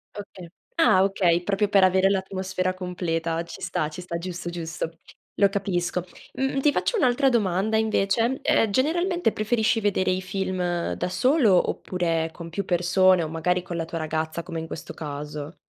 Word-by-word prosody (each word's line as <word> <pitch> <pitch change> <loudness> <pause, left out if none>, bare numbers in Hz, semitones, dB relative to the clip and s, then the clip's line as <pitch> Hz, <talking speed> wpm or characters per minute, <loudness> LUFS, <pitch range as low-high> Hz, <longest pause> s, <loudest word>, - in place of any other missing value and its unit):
Okay, 190 -4 -9 0.3
ah, 195 - +5
okay, 180 -3 +2
proprio 205 +2 0
per 200 -2 +5
avere 190 +1 +4
l'atmosfera 190 -1 -1
completa. 170 -3 -2
Ci 170 - -11
sta, 180 -4 -1
ci 170 +4 -8
sta, 170 -1 -4
giusto, 175 0 -5
giusto, 165 -1 -5 0.4
lo 200 - +5
capisco. 180 -3 -1 0.3
Mh-mh, 270 +1 -1
ti 295 +2 +3
faccio 475 - 0
un'altra 265 - +3
domanda, 210 -2 +1
invece 220 +3 +1
eh, 225 - +3
generalmente 345 - +1
preferisci 225 +1 +1
vedere 200 -3 +1
i 185 0 -1
film 185 -2 -2
da - - -2
solo, 235 - +3
oppure 165 -3 -1
con 170 -1 -9
più 190 +3 -3
persone, 180 0 +3
o 155 - -4
magari 180 +3 0
con 175 -1 -6
la 165 - -2
tua 165 0 -5
ragazza, 160 +1 -3
come 170 -2 -5
in 160 - -6
questo 160 - -7
caso? 150 +1 -6
185 Hz, 170 wpm, -25 LUFS, 170-205 Hz, 0.4 s, ah